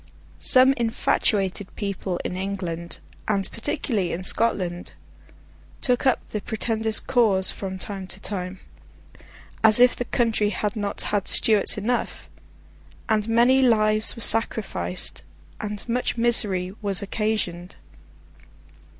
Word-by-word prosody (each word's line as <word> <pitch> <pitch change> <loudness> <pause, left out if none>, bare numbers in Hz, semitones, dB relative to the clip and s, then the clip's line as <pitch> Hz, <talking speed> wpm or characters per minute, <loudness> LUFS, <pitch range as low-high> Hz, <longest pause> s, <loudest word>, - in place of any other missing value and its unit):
Some 260 +1 +5
infatuated 205 -4 0
people 195 -3 -4
in 180 - -4
England, 180 -3 -5 0.3
and 195 -3 +1
particularly 230 - -2
in 180 - -5
Scotland, 185 -4 +1 0.9
took 250 0 +1
up 260 - 0
the 210 - -3
Pretender's 220 0 0
cause 205 -7 +3
from 190 -1 -6
time 195 0 -6
to 190 +1 -3
time—as 195 +3 -4
if 250 0 +5
the 245 - -4
country 225 -3 0
had 210 -1 -3
not 205 -2 -4
had 205 -2 -2
Stuarts 215 -2 +4
enough!—and 215 -1 -5
many 240 +3 +4
lives 215 -3 +4
were 230 - -2
sacrificed, 95 - 0 0.4
and 210 +1 -6
much 245 +1 -2
misery 205 -6 0
was 200 -1 -1
occasioned. 200 -4 -3
210 Hz, 110 wpm, -23 LUFS, 190-230 Hz, 0.9 s, Some